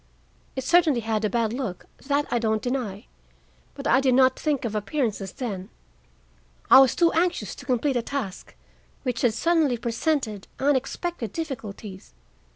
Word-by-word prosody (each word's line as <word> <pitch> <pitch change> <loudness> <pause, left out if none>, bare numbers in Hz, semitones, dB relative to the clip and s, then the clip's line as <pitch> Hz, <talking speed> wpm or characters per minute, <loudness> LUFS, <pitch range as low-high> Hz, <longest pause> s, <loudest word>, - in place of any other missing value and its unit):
"It 265 - -3
certainly 310 -3 +4
had 220 -1 -1
a 215 - +2
bad 230 0 0
look,—that 270 +5 -3
I 240 - +2
don't 220 -1 0
deny; 245 -5 -3 0.7
but 280 - -8
I 255 - +4
did 260 -2 +3
not 260 0 +5
think 295 -5 0
of 220 - -2
appearances 210 -3 -2
then. 205 -7 -5 1.0
I - - +11
was 265 -3 +5
too 340 -1 +4
anxious 345 +2 0
to - - -12
complete 260 +2 +1
a - - +1
task 235 -6 -5 0.5
which 250 -4 -2
had 230 -3 +2
suddenly 320 -5 +2
presented 235 - -1
unexpected 270 - -1
difficulties. 215 - -7
250 Hz, 150 wpm, -25 LUFS, 220-280 Hz, 1.0 s, I